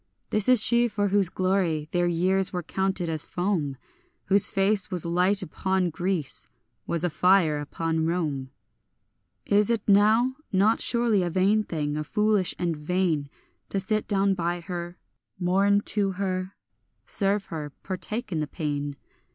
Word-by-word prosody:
This 215 Hz, +2 st, +2 dB
is 250 Hz, -4 st, +6 dB
she 240 Hz, +1 st, +3 dB
for 205 Hz, -2 st, -1 dB
whose 195 Hz, -2 st, +2 dB
glory 185 Hz, -5 st, 0 dB
their 175 Hz, 0 st, +1 dB
years 185 Hz, +3 st, +1 dB
were 180 Hz, -1 st, -3 dB
counted 190 Hz, +1 st, -1 dB
as 160 Hz, -2 st, -1 dB
foam; 175 Hz, -7 st, -2 dB, 0.5 s
Whose 200 Hz, 0 st, +5 dB
face 195 Hz, 0 st, +1 dB
was 180 Hz, -4 st, -3 dB
a 170 Hz, -, -4 dB
light 185 Hz, +4 st, +2 dB
upon 190 Hz, -1 st, -1 dB
Greece, 175 Hz, -4 st, -2 dB, 0.4 s
was 170 Hz, 0 st, -1 dB
a 175 Hz, -, +2 dB
fire 175 Hz, -3 st, +3 dB
upon 160 Hz, +2 st, -2 dB
Rome. 150 Hz, -6 st, -2 dB, 1.0 s
Is 205 Hz, +1 st, +3 dB
it 230 Hz, -3 st, -1 dB
now 220 Hz, +6 st, +4 dB
not 205 Hz, +3 st, +3 dB
surely 235 Hz, -4 st, +2 dB
a 175 Hz, -, -1 dB
vain 195 Hz, +5 st, +2 dB
thing, 150 Hz, -5 st, -3 dB
a 155 Hz, -, -2 dB
foolish 210 Hz, +2 st, +1 dB
and 170 Hz, -2 st, -1 dB
vain, 155 Hz, -2 st, -1 dB, 0.4 s
To 195 Hz, -, -1 dB
sit 215 Hz, +2 st, -1 dB
down 195 Hz, -1 st, +2 dB
by 175 Hz, -1 st, -2 dB
her, 175 Hz, 0 st, -6 dB, 0.4 s
mourn 195 Hz, +3 st, +2 dB
to 200 Hz, -2 st, +1 dB
her, 185 Hz, 0 st, -3 dB, 0.5 s
serve 200 Hz, 0 st, 0 dB
her, 150 Hz, -2 st, -5 dB
partake 210 Hz, +4 st, -4 dB
in 165 Hz, -, -1 dB
the 150 Hz, -, -2 dB
pain? 145 Hz, -3 st, -3 dB
185 Hz, 155 wpm, -26 LUFS, 170-200 Hz, 1.0 s, is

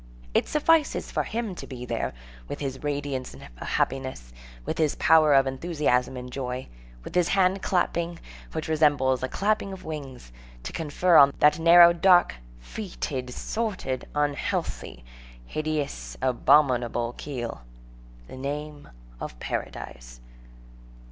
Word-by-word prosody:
It -, -, +2 dB
suffices 305 Hz, 0 st, +2 dB
for -, -, 0 dB
him 225 Hz, -3 st, -3 dB
to -, -, -9 dB
be 125 Hz, -2 st, -7 dB
there, -, -, -2 dB, 0.3 s
with -, -, -6 dB
his 135 Hz, -2 st, -4 dB
radiance 145 Hz, -3 st, -3 dB
of -, -, -13 dB, 0.2 s
happiness, 130 Hz, -, -2 dB, 0.3 s
with -, -, -3 dB
his 155 Hz, -2 st, +2 dB
power 155 Hz, -3 st, +5 dB
of 135 Hz, 0 st, +5 dB
enthusiasm 135 Hz, -3 st, 0 dB
and 125 Hz, 0 st, -7 dB
joy, 125 Hz, -1 st, -5 dB, 0.3 s
with -, -, -9 dB
his 180 Hz, -1 st, +3 dB
hand 190 Hz, 0 st, +2 dB
clapping, 170 Hz, -2 st, 0 dB, 0.3 s
which 160 Hz, -1 st, -4 dB
resembles 145 Hz, -5 st, +2 dB
a 130 Hz, -, -1 dB
clapping 205 Hz, +4 st, 0 dB
of 190 Hz, -1 st, -9 dB
wings, 140 Hz, -, -7 dB, 0.3 s
to -, -, -6 dB
confer 165 Hz, +2 st, +2 dB
on 140 Hz, 0 st, +7 dB
that 150 Hz, +2 st, +4 dB
narrow, 170 Hz, +1 st, +8 dB
dark, 175 Hz, 0 st, +5 dB, 0.3 s
fetid, 130 Hz, -, -5 dB
sordid, 185 Hz, -, -3 dB
unhealthy, 145 Hz, -, -2 dB, 0.4 s
hideous, 155 Hz, -, -3 dB
abominable 125 Hz, -2 st, +2 dB
keel, 120 Hz, -, -5 dB, 0.7 s
the 130 Hz, -, -10 dB
name 145 Hz, +2 st, -5 dB, 0.3 s
of -, -, -7 dB
Paradise. -, -, -6 dB
145 Hz, 130 wpm, -26 LUFS, 130-170 Hz, 0.7 s, narrow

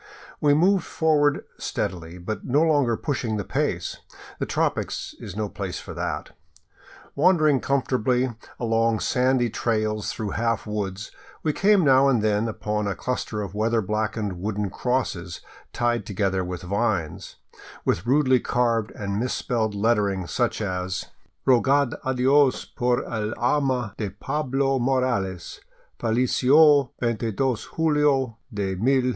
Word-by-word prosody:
We 145 Hz, -1 st, +4 dB
moved 185 Hz, +5 st, +3 dB
forward 150 Hz, -2 st, +1 dB
steadily, 85 Hz, -1 st, -4 dB
but 100 Hz, +5 st, -5 dB
no 145 Hz, +5 st, +2 dB
longer 145 Hz, -8 st, +2 dB
pushed 145 Hz, -3 st, -2 dB, 0.2 s
the 100 Hz, -, -2 dB
pace; -, -, -2 dB, 0.4 s
the -, -, -2 dB
tropics -, -, -1 dB
is 100 Hz, -, -8 dB
no 105 Hz, 0 st, -2 dB
place 95 Hz, -2 st, -5 dB
for -, -, -9 dB
that. -, -, -4 dB, 0.8 s
Wandering 155 Hz, -3 st, +4 dB
comfortably 130 Hz, -1 st, +1 dB, 0.3 s
along 115 Hz, -1 st, +1 dB
sandy 125 Hz, -1 st, +2 dB
trails 110 Hz, -2 st, -1 dB
through 110 Hz, -4 st, -4 dB
half 115 Hz, 0 st, -1 dB
woods, 105 Hz, -1 st, -4 dB, 0.3 s
we 155 Hz, -, +1 dB
came 200 Hz, +1 st, +4 dB
now 135 Hz, -1 st, +5 dB
and 120 Hz, -5 st, +2 dB
then 105 Hz, +1 st, +1 dB
upon 105 Hz, -1 st, -2 dB
a 100 Hz, -, -2 dB
cluster 110 Hz, -4 st, -3 dB
of 100 Hz, -2 st, -7 dB
weather 115 Hz, +2 st, +1 dB
blackened 105 Hz, -2 st, -2 dB
wooden 105 Hz, -1 st, -2 dB
crosses 95 Hz, -10 st, -2 dB, 0.3 s
tied 120 Hz, -1 st, 0 dB
together 95 Hz, -2 st, 0 dB
with 90 Hz, -1 st, -5 dB
vines, 100 Hz, -4 st, -2 dB, 0.5 s
with 95 Hz, +7 st, 0 dB
rudely 130 Hz, -1 st, +4 dB
carved 115 Hz, -3 st, 0 dB
and 100 Hz, 0 st, -3 dB
misspelled 115 Hz, -3 st, -1 dB
lettering, 100 Hz, -3 st, +1 dB
such 120 Hz, +5 st, -1 dB
as: 90 Hz, -2 st, -3 dB, 0.2 s
" -, -, -42 dB
Rogad 135 Hz, +1 st, +4 dB
adios 130 Hz, +1 st, +3 dB
por 125 Hz, 0 st, 0 dB
el 110 Hz, -1 st, -3 dB
alma 125 Hz, -4 st, 0 dB
de 105 Hz, -3 st, -2 dB
Pablo 135 Hz, +5 st, -1 dB
Morales 120 Hz, -8 st, -1 dB, 0.4 s
Fallesio 130 Hz, +4 st, +4 dB
22 115 Hz, -2 st, -1 dB, 0.4 s
jullo 150 Hz, -7 st, +2 dB
de 100 Hz, -3 st, -2 dB
191 130 Hz, +7 st, +2 dB
1. 125 Hz, -, +1 dB
115 Hz, 135 wpm, -24 LUFS, 105-130 Hz, 0.8 s, now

